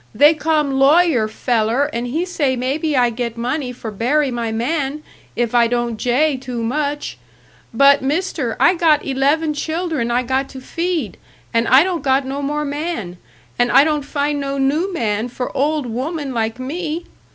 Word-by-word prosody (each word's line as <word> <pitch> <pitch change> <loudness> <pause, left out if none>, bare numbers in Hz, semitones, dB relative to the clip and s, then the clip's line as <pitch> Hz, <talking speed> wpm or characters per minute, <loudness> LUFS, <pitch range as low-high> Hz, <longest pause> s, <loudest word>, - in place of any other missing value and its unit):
They 295 +3 +6
come 300 -3 0
lawyer 285 -4 +4
feller 230 +3 0
and 235 +1 -2
he 315 +8 -1
say 290 -7 0
maybe 280 +4 -1
I 245 -1 +3
get 235 0 -4
money 250 +3 -2
for 235 -3 -7
bury 260 +7 +1
my 235 -2 -2
man, 275 +5 -2 0.3
if 240 -1 -1
I 235 -1 +4
don't 240 -1 -1
jay 265 +6 +1
too 250 -2 -5
much. 290 +4 -2 0.5
But, 275 +4 +5
Mister, 290 -3 -2
I - - +5
got 325 -4 +2
eleven 290 +4 +1
children 315 -4 -2
I 245 +1 +1
got 265 +2 -1
to 265 - -9
feed, 330 - -3 0.4
and 230 0 +2
I 260 +4 +7
don't 360 -2 -2
got 270 0 +1
no 275 +2 -4
more 295 +1 -2
man, 285 - -4 0.4
and 245 0 +3
I 275 - +7
don't 300 -1 0
find 290 +1 -2
no 275 0 -3
new 300 +8 +1
man 220 - -1
for 250 +1 -5
old 295 +1 0
woman 270 +4 -4
like 225 -1 -1
me. 320 +5 -4
275 Hz, 175 wpm, -19 LUFS, 240-305 Hz, 0.5 s, I